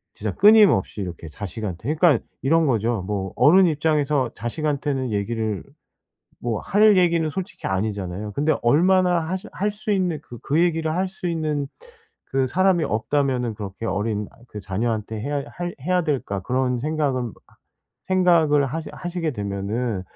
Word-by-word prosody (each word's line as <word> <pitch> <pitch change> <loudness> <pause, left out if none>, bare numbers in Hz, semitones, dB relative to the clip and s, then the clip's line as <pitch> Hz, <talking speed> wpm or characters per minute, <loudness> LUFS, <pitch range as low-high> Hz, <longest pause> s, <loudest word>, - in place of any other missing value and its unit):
진짜 105 -1 -3
끊임없이 205 - +5
이렇게 85 -3 -6
자식한테 105 - -4
그러니까 155 -6 +3 0.2
이런 165 +4 +3
거죠. 115 -4 0
뭐 95 -2 -3
어른 185 +5 +6
입장에서 150 -5 +1
자식한테는 140 +1 -2
얘기를 105 -1 -2 0.8
뭐 115 -3 -2
할 210 +1 +4
얘기는 170 -2 +3
솔직히 180 +4 -6 0.4
아니잖아요. 100 +4 -6
근데 150 +7 +1
얼마나 180 +7 +4
하실 185 +6 -4
할 205 +2 0
수 210 +1 -5
있는 180 -6 0
그 120 -5 -11
그 150 +4 +1
얘기를 165 -2 +1
할 185 +2 0
수 185 -1 -7
있는 155 -4 -1 0.6
그 135 -1 0
사람이 180 +4 +2
없다면은 125 0 0
그렇게 100 +1 -6
어린 105 +1 -2 0.2
그 105 - -7
자녀한테 110 +2 -2
해야 145 +4 -2
할 175 0 -5
해야 180 +4 +1
될까 130 - -2
그런 125 +3 0
생각은 135 -5 -1 0.7
생각을 170 -6 +3
하시 160 +5 -5
하시게 175 -2 -3
되면은 100 +1 -3
140 Hz, 325 characters per minute, -23 LUFS, 110-170 Hz, 0.8 s, 어른